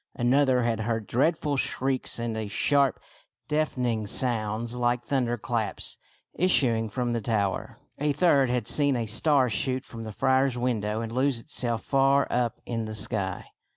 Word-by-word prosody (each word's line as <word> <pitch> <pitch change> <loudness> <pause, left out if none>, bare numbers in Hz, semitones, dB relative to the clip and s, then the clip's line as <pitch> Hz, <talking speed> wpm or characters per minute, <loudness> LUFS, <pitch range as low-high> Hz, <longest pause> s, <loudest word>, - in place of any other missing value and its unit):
Another 130 +1 +3
had 115 -2 0
heard 110 0 -2
dreadful 145 - +1
shrieks 130 0 -1
and 110 -3 -3
sharp, 140 +1 +2 0.5
deafening 125 -8 -1
sounds 115 0 -1
like 120 0 0
thunder 125 -4 0
claps 115 -1 -3 0.3
issuing 120 -11 +2
from 120 +2 -2
the 115 - -1
tower. 100 -3 -1 0.2
A 150 +1 +1
third 140 -3 +3
had 125 -3 0
seen 145 +1 +3
a 120 -2 -1
star 130 +5 +2
shoot 130 +4 -1
from 115 -1 -8
the 110 - -6
friar's 130 +2 +2
window 110 -3 -1
and 115 -1 -5
lose 130 0 +1
itself 115 -1 -1
far 135 0 +3
up 120 -2 0
in 115 -2 -3
the 110 0 -6
sky. 100 -3 -2
120 Hz, 155 wpm, -27 LUFS, 110-135 Hz, 0.5 s, Another